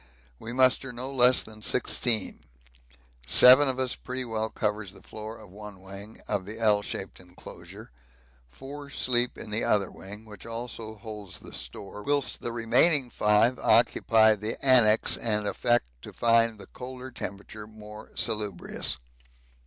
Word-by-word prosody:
We 115 Hz, -, -7 dB
muster 130 Hz, +1 st, +3 dB
no 125 Hz, +3 st, -6 dB
less 125 Hz, -1 st, +5 dB
than 110 Hz, 0 st, -13 dB
sixteen. 115 Hz, 0 st, +1 dB, 0.9 s
Seven 130 Hz, -, +8 dB
of 130 Hz, -, -2 dB
us 130 Hz, -1 st, -1 dB
pretty 130 Hz, 0 st, -5 dB
well 110 Hz, -1 st, -2 dB
cover 105 Hz, 0 st, -2 dB
the 100 Hz, 0 st, -12 dB
floor 110 Hz, +1 st, -8 dB
of 105 Hz, -4 st, -14 dB
one 105 Hz, -1 st, -11 dB
wing 100 Hz, +3 st, -10 dB
of 100 Hz, -3 st, -2 dB
the 110 Hz, +2 st, -7 dB
L 105 Hz, -2 st, +3 dB
shaped 95 Hz, -1 st, -6 dB
enclosure, 90 Hz, -7 st, -13 dB, 0.6 s
four 140 Hz, -, -10 dB
sleep 125 Hz, -3 st, 0 dB
in 105 Hz, -, -8 dB
the 110 Hz, +2 st, 0 dB
other 100 Hz, -3 st, +1 dB
wing, 105 Hz, +3 st, -10 dB
which 105 Hz, -3 st, -11 dB
also 115 Hz, -1 st, -6 dB
holds 105 Hz, -3 st, -7 dB
the -, -, -13 dB
store, 65 Hz, +11 st, -6 dB
whilst 145 Hz, +2 st, -1 dB
the 120 Hz, -, -4 dB
remaining 125 Hz, +4 st, +2 dB
five 105 Hz, +4 st, +3 dB
occupy 110 Hz, -1 st, +4 dB
the 105 Hz, +2 st, -4 dB
annexe 115 Hz, -5 st, +5 dB
and 105 Hz, -2 st, -1 dB
affect 110 Hz, -, 0 dB
to -, -, -10 dB
find 115 Hz, -1 st, +2 dB
the 100 Hz, -, -11 dB
colder 130 Hz, 0 st, -9 dB
temperature 100 Hz, +1 st, -8 dB
more 105 Hz, 0 st, -12 dB
salubrious. 105 Hz, -, -2 dB
110 Hz, 150 wpm, -27 LUFS, 105-125 Hz, 0.9 s, Seven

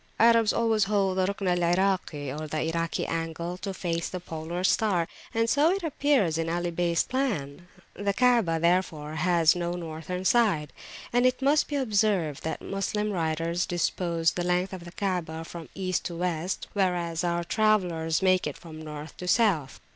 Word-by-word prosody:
Arabs 230 Hz, -1 st, +5 dB
always 225 Hz, -3 st, +2 dB
hold 195 Hz, -2 st, +1 dB
the 185 Hz, 0 st, +2 dB
Rukn 200 Hz, -1 st, -3 dB
al 180 Hz, 0 st, +2 dB
Iraki, 175 Hz, -5 st, 0 dB
or 155 Hz, +3 st, -5 dB
Irak 165 Hz, +1 st, -1 dB
angle, 165 Hz, +1 st, -3 dB
to 195 Hz, +1 st, -4 dB
face 170 Hz, -3 st, -2 dB
the 185 Hz, -, -5 dB
polar 170 Hz, +1 st, -5 dB
star, 190 Hz, -4 st, +2 dB, 0.2 s
and 225 Hz, 0 st, +1 dB
so 290 Hz, +6 st, +4 dB
it 385 Hz, +1 st, 0 dB
appears 275 Hz, -, +1 dB
in 165 Hz, 0 st, -1 dB
Ali 175 Hz, +1 st, -1 dB
Beys 170 Hz, 0 st, +1 dB
plan. 180 Hz, -, -2 dB, 0.3 s
The 200 Hz, 0 st, -1 dB
Kaabah, 230 Hz, -7 st, +3 dB
therefore, 170 Hz, -3 st, 0 dB
has 170 Hz, 0 st, +4 dB
no 175 Hz, 0 st, -2 dB
Northern 170 Hz, +2 st, -5 dB
side. 190 Hz, -, +2 dB, 0.4 s
And 245 Hz, +1 st, +4 dB
it 255 Hz, -, 0 dB
must 290 Hz, +2 st, +3 dB
be 295 Hz, -, -3 dB
observed 205 Hz, -, +1 dB
that 160 Hz, -, -4 dB
Moslem 210 Hz, +2 st, -2 dB
writers 165 Hz, 0 st, -1 dB
dispose 170 Hz, -2 st, 0 dB
the 175 Hz, -, -3 dB
length 180 Hz, +2 st, 0 dB
of 180 Hz, -2 st, -7 dB
the 175 Hz, -, -9 dB
Kaabah 175 Hz, -4 st, -3 dB
from 165 Hz, -5 st, -9 dB
East 185 Hz, -2 st, -1 dB
to 170 Hz, -, -4 dB
West, 175 Hz, +1 st, -2 dB
whereas 175 Hz, -4 st, 0 dB
our 170 Hz, 0 st, 0 dB
travellers 180 Hz, -5 st, +1 dB
make 185 Hz, -1 st, +3 dB
it -, -, -5 dB
from 160 Hz, -2 st, -10 dB
North 150 Hz, 0 st, -8 dB
to 180 Hz, -, -6 dB
South. 180 Hz, -, +2 dB
180 Hz, 170 wpm, -27 LUFS, 165-200 Hz, 0.4 s, Arabs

